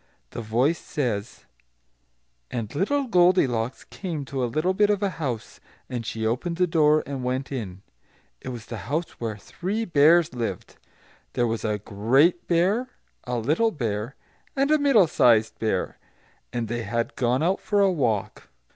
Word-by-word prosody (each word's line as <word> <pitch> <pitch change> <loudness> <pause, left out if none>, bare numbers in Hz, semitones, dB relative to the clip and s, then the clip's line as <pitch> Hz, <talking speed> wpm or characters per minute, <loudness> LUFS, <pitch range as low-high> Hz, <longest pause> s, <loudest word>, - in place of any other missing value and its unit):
The - - -5
voice 125 +9 +1
says, 115 -7 -3 1.0
"And 115 -4 -4
little 275 - +1
Goldilocks 175 - +2
came 165 -7 -5
to 135 -1 -3
a 120 - 0
little 155 +9 0
bit 205 +2 +3
of 205 -1 +1
a 200 - +1
house. 120 -7 -4 0.3
And 120 -3 -4
she 110 0 -3
opened 145 +10 -1
the 180 - +3
door 155 -2 +3
and 135 -2 -5
went 130 +2 -2
in. 100 -8 -5 0.6
It - - -6
was 120 -3 -7
the 115 - -6
house 160 +4 -1
where 110 -3 -3
three 195 - -4
Bears 160 -2 +4
lived; 115 -7 -5 0.6
there 120 - +1
was 115 -1 -2
a 105 -1 0
great 120 - +2
Bear, 195 +9 +2 0.4
a 125 -1 -2
little 155 - +2
Bear, 115 - -3 0.4
and 275 +2 +2
a 310 - +5
middle 275 -9 +5
sized 115 -7 +3
Bear; 110 -5 -1 0.5
and 120 -1 -2
they 120 +2 -3
had 115 +2 -2
gone 125 +3 +1
out 185 +3 +1
for 205 -1 0
a 195 -1 +4
walk. 120 - -2
135 Hz, 165 wpm, -25 LUFS, 115-175 Hz, 1.0 s, a